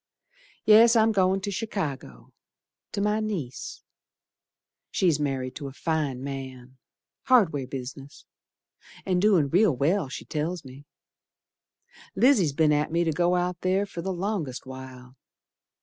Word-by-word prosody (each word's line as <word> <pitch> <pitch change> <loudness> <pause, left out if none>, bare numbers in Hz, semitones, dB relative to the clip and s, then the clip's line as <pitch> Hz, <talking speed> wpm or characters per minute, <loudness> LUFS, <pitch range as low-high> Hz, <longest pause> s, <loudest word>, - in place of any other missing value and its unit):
Yes, 225 +2 +7
I'm 225 0 +4
goin' 190 -1 +2
to 200 +1 -3
Chicago, 150 - -5 0.6
To 200 - -2
my 210 +1 +1
niece, 180 - -5 1.1
She's 170 -6 +1
married 135 -3 -2
to 145 - -6
a 135 - -9
fine 145 -4 -2
man, 130 -2 -7 0.5
hardware 180 - +3
business, 135 +1 -8 0.8
An' 185 -2 +1
doin' 185 -8 +3
real 185 -1 +3
well, 155 +4 +1
she 130 - -7
tells 155 +1 -3
me. 135 +2 -12 1.3
Lizzie's 225 - +4
be'n 155 +1 +3
at 150 +1 0
me 170 +1 +2
to 165 - 0
go 175 +3 +1
out 180 0 -1
ther 190 +2 +1
for 185 -4 -7
the 190 +3 -3
longest 180 -8 -3
while. 130 -1 -11
160 Hz, 135 wpm, -26 LUFS, 135-195 Hz, 1.3 s, Yes